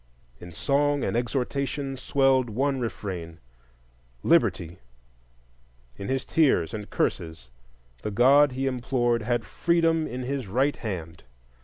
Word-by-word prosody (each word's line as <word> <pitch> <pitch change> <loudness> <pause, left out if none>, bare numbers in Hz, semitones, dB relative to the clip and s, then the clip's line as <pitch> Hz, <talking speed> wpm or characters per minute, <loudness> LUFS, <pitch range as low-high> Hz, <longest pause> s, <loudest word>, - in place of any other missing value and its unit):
In 85 - -10
song 140 - +1
and - - -1
exhortation 135 +3 -2
swelled 130 -1 +2
one 135 +5 0
refrain—Liberty; 60 - -3 1.2
in 100 - -7
his 135 0 -1
tears 135 - +2
and 105 -1 -6
curses 80 -7 -3 0.5
the - - -3
God 135 +6 +5
he 135 +1 -2
implored 120 -2 0
had 120 +2 -1
Freedom 165 -1 +1
in 125 +1 -5
his 135 -2 -3
right 130 +9 +1
hand. 85 -7 -6
120 Hz, 115 wpm, -26 LUFS, 85-135 Hz, 1.2 s, God